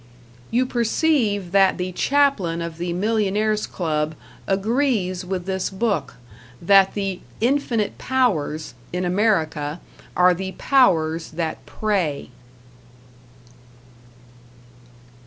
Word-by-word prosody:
You 250 +2 +2
perceive 235 - +1
that 195 -1 +4
the 180 0 -3
Chaplain 245 -8 +1
of 170 -1 -6
the 175 0 -2
Millionaires' 210 +2 0
Club 155 -3 -2 0.3
agrees 195 -2 0
with 180 -1 -4
this 190 -1 -2
book, 205 +2 -2 0.4
that 195 +2 +4
the 195 -3 -2 0.2
"infinite 235 -3 0
powers" 165 - 0 0.2
in 180 +1 -2
America 175 -6 0 0.4
are 180 0 +6
the 190 +2 -5
powers 165 -11 +2
that 160 0 -4
prey! 185 -12 -2
190 Hz, 95 wpm, -22 LUFS, 170-220 Hz, 0.4 s, are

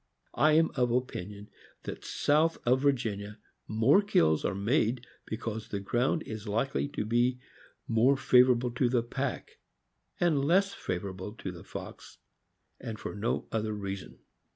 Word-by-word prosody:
I 155 +2 +4
am 160 +1 +4
of 125 -2 +1
opinion 105 -5 -3 0.3
that - - -7
south 155 +3 +2
of 130 +2 +3
Virginia 110 -7 -1 0.3
more 115 - +4
kills 80 - +2
are - - -1
made 120 +3 +1 0.2
because 110 -1 -4
the 100 - -3
ground 120 +10 0
is 110 0 -7
likely 115 +7 0
to 140 -7 -4
be 120 +3 +2 0.5
more 120 +5 +3
favorable 125 -2 +4
to 125 +1 +1
the 120 -2 +1
pack 130 +2 -4 0.6
and 160 -6 +2
less 195 +6 +3
favorable 95 +2 -5
to 95 -5 -6
the 85 -2 -11
fox, - - -9 0.6
and 110 -2 -6
for - - -5
no 105 +3 -2
other 110 -1 -1
reason. 100 -2 -6
120 Hz, 145 wpm, -30 LUFS, 105-135 Hz, 0.6 s, I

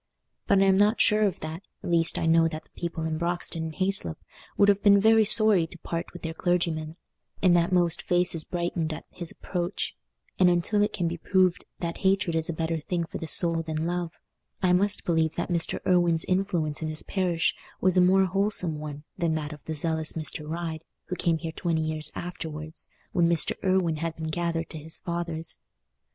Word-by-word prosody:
But 200 - +4
I - - +4
am 190 0 +4
not 210 +2 +3
sure 210 0 +4
of 200 -4 0
that; 155 +3 -6 0.2
at - - -4
least 165 -1 +1
I - - -1
know 165 0 +4
that 155 -1 -6
the - - -33
people 170 -1 -5
in 160 -1 -2
Broxton 170 -1 -1
and 160 -1 -6
Hayslope 185 - 0 0.4
would 200 - +5
have 205 0 +3
been 200 -1 +6
very 220 +2 +5
sorry 205 -6 +5
to 175 - -12
part 170 0 -5
with 175 - -11
their 165 -1 -3
clergyman, 165 -2 -1 0.5
and 180 -2 +5
that 170 +1 +2
most 175 -2 +2
faces 175 -2 +1
brightened 170 -2 -2
at - - -8
his 175 -2 -4
approach; 180 +1 -4 0.4
and 180 -1 +6
until 175 +4 +1
it 210 +1 +2
can 175 - -1
be 170 0 -4
proved 185 0 +1 0.2
that 170 -1 -3
hatred 190 -3 +1
is 160 0 -1
a - - +1
better 165 0 -2
thing 170 +3 -2
for - - -7
the 165 - -5
soul 165 +1 +4
than 160 0 -3
love, 175 0 -2 0.5
I 180 -1 +2
must 200 +3 +1
believe 160 -2 +1
that - - -3
Mr. 170 -1 +2
Irwine's 175 -3 +3
influence 175 -5 -1
in 160 - -2
his 155 0 -3
parish 180 -4 0 0.3
was 185 -1 +2
a 180 - +5
more 190 +2 +4
wholesome 185 -4 0
one 150 -1 -7 0.2
than 165 -2 +1
that 150 -1 -4
of 150 - -13
the 160 - -4
zealous 160 0 +2
Mr. 150 -1 -3
Ryde, 165 -1 -4 0.3
who 180 - -2
came 170 -2 +1
there 165 0 -5
twenty 165 -1 -1
years 155 -1 +3
afterwards, 160 -3 -7 0.2
when 170 -2 +2
Mr. 170 -2 +2
Irwine 185 -4 +1
had 165 +1 -3
been 160 0 -5
gathered 165 0 -2
to 160 - -6
his 160 +2 -6
fathers. 170 -2 -4
170 Hz, 205 wpm, -26 LUFS, 160-180 Hz, 0.5 s, been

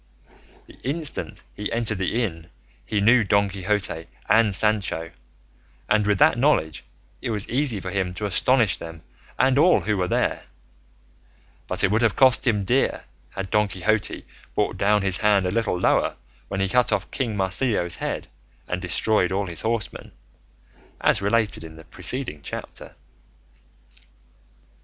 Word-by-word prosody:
The - - -17
instant 150 +3 -2
he 105 - -5
entered 115 -4 -1
the 110 +6 0
inn 85 -5 -5 0.4
he 105 - 0
knew 115 +3 +5
Don 100 0 +2
Quixote 95 -4 -2 0.2
and 110 -3 +4
Sancho, 100 -6 0 0.8
and 105 -1 +2
with 105 -1 +2
that 115 - +4
knowledge 120 - +1 0.4
it - - -3
was 105 -3 0
easy 125 -4 0
for 95 -1 -6
him 95 -2 -2
to 105 - -4
astonish 115 +3 +3
them 80 -1 -10 0.3
and 130 +1 +3
all 175 +4 +5
who 105 0 0
were 90 -1 0
there; - - -1 1.2
but - - -2
it 95 - +3
would 110 +2 +2
have 115 -2 +2
cost 130 0 +4
him 105 -4 +2
dear 125 +7 +1 0.3
had 95 -1 -6
Don 105 0 +3
Quixote 100 +3 -1 0.3
brought - - 0
down 105 0 +2
his 95 -2 +1
hand 105 -3 +3
a 90 - 0
little 110 -4 0
lower - - +2 0.3
when 95 - -3
he 95 - +1
cut 125 +5 +2
off - - -1
King 120 -6 -2
Marsilio's 95 -2 0
head - - -4 0.4
and 90 0 -3
destroyed 90 +2 +1
all 100 +1 0
his 85 -3 -4
horsemen, 115 0 -3 0.9
as - - +3
related 105 -3 0
in 80 -1 -10
the 80 - -13
preceeding 125 - -4
chapter. - - -8
105 Hz, 155 wpm, -24 LUFS, 95-115 Hz, 1.2 s, knew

